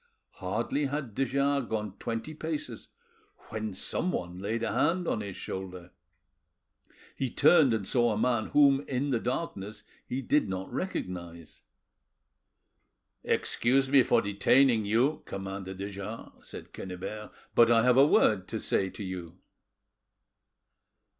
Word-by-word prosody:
Hardly 115 +10 -1
had 140 -5 -4
de 135 - 0
Jars 140 0 +1
gone 105 -3 -3
twenty 115 +6 -4
paces 150 -7 -5 0.6
when 110 -3 -4
someone 90 - -2
laid 110 +4 -2
a - - -1
hand 170 - +1
on 105 - 0
his 100 -3 -6
shoulder. 90 -2 -7 1.2
He 130 - -2
turned 155 +1 +5
and 110 -4 -1
saw 120 -2 +2
a 105 - -1
man 120 -1 +1
whom, 140 -2 +5
in 140 +2 -1
the 120 - +1
darkness, 110 -5 -4 0.2
he 130 +2 -3
did 145 -4 +2
not 95 +3 -5
recognise. 85 - -5 1.6
"Excuse 135 +3 +1
me 140 -2 +7
for 120 -1 +3
detaining 115 +3 +3
you, 120 +9 +2
Commander 95 0 -6
de 100 +2 -5
Jars," 100 +3 -9
said - - -10
Quennebert, 95 +3 -7 0.2
"but 120 -1 +6
I 115 -1 +5
have 125 0 +4
a 140 +2 +7
word 100 -9 +3
to 110 - -3
say 95 -2 0
to 105 - -8
you." 90 -2 -7
115 Hz, 135 wpm, -29 LUFS, 95-135 Hz, 1.6 s, me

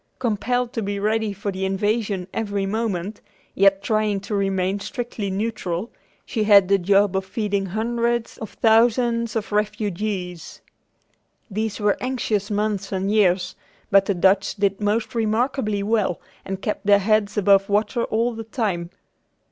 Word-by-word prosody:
Compelled 245 +1 -1
to 225 - -2
be 200 0 -3
ready 215 +1 0
for 200 +1 -4
invasion 195 +1 -1
every 200 -3 -2
moment, 205 -2 -3 0.3
yet 195 0 +3
trying 215 -2 +1
to 200 - -6
remain 195 -1 0
strictly 235 -2 -4
neutral, 195 -1 -3 0.3
she 220 -3 -1
had 200 -3 +7
the 200 +1 +3
job 200 +1 +3
of 190 - 0
feeding 200 0 -2
hundreds 235 +3 -1
of 220 - -6
thousands 230 0 +3
of 215 -2 -3
refugees. 205 -4 -3 0.9
These 215 +1 -2
were 205 -1 +2
anxious 230 -5 -1
months 205 -2 -1
and 195 +1 -1
years, 185 -4 +2 0.4
but 195 0 +5
the 200 - +1
Dutch 190 +2 +2
did 200 -1 0
most 215 +4 0
remarkably 220 -1 0
well 210 -4 0 0.3
and 195 0 -5
kept 210 -1 -3
their 205 -1 +7
heads 210 0 +1
above 195 -1 +4
water 215 +4 +1
all 230 +2 0
the 225 0 -6
time. 200 -7 -2
205 Hz, 145 wpm, -22 LUFS, 195-220 Hz, 0.9 s, had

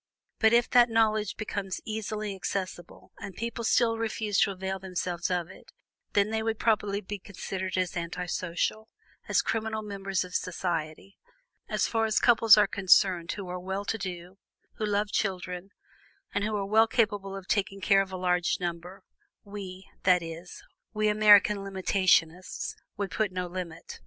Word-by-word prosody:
But 220 -1 +5
if 240 +1 +4
that 245 -1 +6
knowledge 215 -2 +1
became 200 -2 -4 0.2
easily 215 -1 -3
accessible, 185 -2 -5
and 200 -2 -8
people 235 +1 -4
still 230 0 +2
refused 215 -2 0
to - - +3
avail 190 0 -4
themselves 180 -2 -3
of 180 -2 -1
it, - - -16 0.4
then 205 +1 +2
they 220 0 0
would 225 0 -1
properly 205 -3 +1
be 205 0 -6
considered 190 -1 -5
as 185 0 -1
anti 175 +1 -4
social, 180 +5 -2 0.4
as - - +2
criminal 220 -1 -2
members 195 -2 -2
of 180 0 -11
society. 175 0 -3 0.5
As - - +1
far 225 -1 +1
as 215 -1 +2
couples 225 -3 +6
are 210 - +6
concerned 185 -3 +3
who 200 -3 -7
are 180 0 -5
well 190 +2 -4
to 225 - -1
do, 180 0 -7 0.4
who 215 - -1
love 205 0 0
children, 185 -2 -2 0.6
and 205 - 0
who 215 0 -1
are 200 -1 -1
well 220 +3 +4
capable 205 -4 0
of 195 -1 -8
taking 195 -1 0
care 195 0 +4
of 195 -1 -5
a 185 - -4
large 180 -1 +1
number, 175 +1 -5 0.4
we, 195 -2 -8 0.2
that 180 -2 +4
is, 165 +2 -9 0.3
we 215 0 +2
American 210 -1 +6
limitationists, 185 -3 +1 0.2
would 200 -1 -3
put 215 -3 0
no 180 0 -3
limit. 175 -2 -7
195 Hz, 165 wpm, -28 LUFS, 180-215 Hz, 0.6 s, that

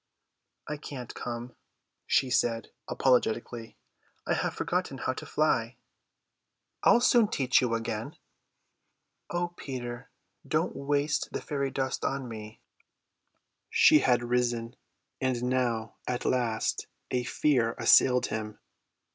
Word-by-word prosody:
"I 150 - -3
can't 130 -4 -8
come," 120 0 -6 0.5
she 130 - +2
said 115 -2 +1 0.2
apologetically, 120 -2 0 0.5
"I - - +1
have - - -1
forgotten - - -2
how - - -1
to - - -8
fly." - - +1 1.0
"I'll 240 - +5
soon 240 -3 +5
teach 130 -9 +2
you 120 -2 +1
again." 115 0 -4 1.1
"O 175 0 -1
Peter, 125 -7 -7 0.4
don't - - 0
waste 145 +2 0
the - - -3
fairy 140 -2 -2
dust 130 -1 -2
on 135 -2 -2
me." 110 -1 -9 1.1
She 155 - +6
had 125 -3 +2
risen; 120 -1 0 0.5
and 130 -2 0
now 120 -3 -1
at 125 -1 -2
last 120 -3 0 0.2
a 125 -1 0
fear 120 -3 +1
assailed 125 -1 +5
him. 105 -1 -4
125 Hz, 115 wpm, -29 LUFS, 120-135 Hz, 1.1 s, She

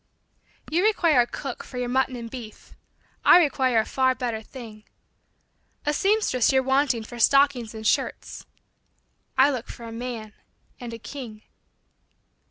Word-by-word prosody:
You 345 +4 +2
require 340 - +4
a 240 - 0
cook 265 +1 -6
for 250 - -10
your 250 0 -2
mutton 260 +1 0
and 235 -1 -6
beef; 230 -3 -10 0.5
I - - +8
require 265 -7 +2
a 220 - 0
far 260 -1 +1
better 240 -4 -3
thing. 220 -3 -11 1.0
A 295 - +1
seamstress 385 - +2
you 265 - +4
're - - -1
wanting 265 -3 +2
for 240 +2 -10
stockings 260 -3 +3
and 220 0 -8
shirts; - - -1 0.9
I 275 +2 +6
look 250 -4 -4
for 235 - -10
a 230 - -7
man 230 -2 -6 0.5
and 240 -2 -7
a 230 - -6
king. 230 -3 -9
250 Hz, 155 wpm, -25 LUFS, 230-275 Hz, 1.0 s, I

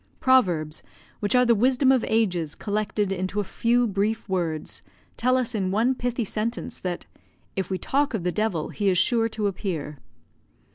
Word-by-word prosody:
Proverbs, 175 - +2 0.4
which 205 +3 0
are 250 0 +5
the 235 - +5
wisdom 255 +4 +3
of 260 -3 +3
ages 180 -9 0
collected 210 -1 -1
into 190 +2 -2
a - - +1
few 235 +5 +1
brief 210 +1 -1
words, 170 -5 -2 0.3
tell 255 +2 +2
us 250 -1 -1
in 195 -4 0
one 225 +7 +2
pithy 245 -2 -2
sentence 220 +4 -3
that 180 -2 -4 0.5
"if 190 - -2
we 190 - -1
talk 275 +4 0
of 195 - -3
the 180 - 0
devil 210 -6 -1
he 205 -2 0
is 185 - +2
sure 230 +4 +3
to 215 -1 -3
appear." 170 -7 -3
210 Hz, 175 wpm, -25 LUFS, 185-240 Hz, 0.5 s, are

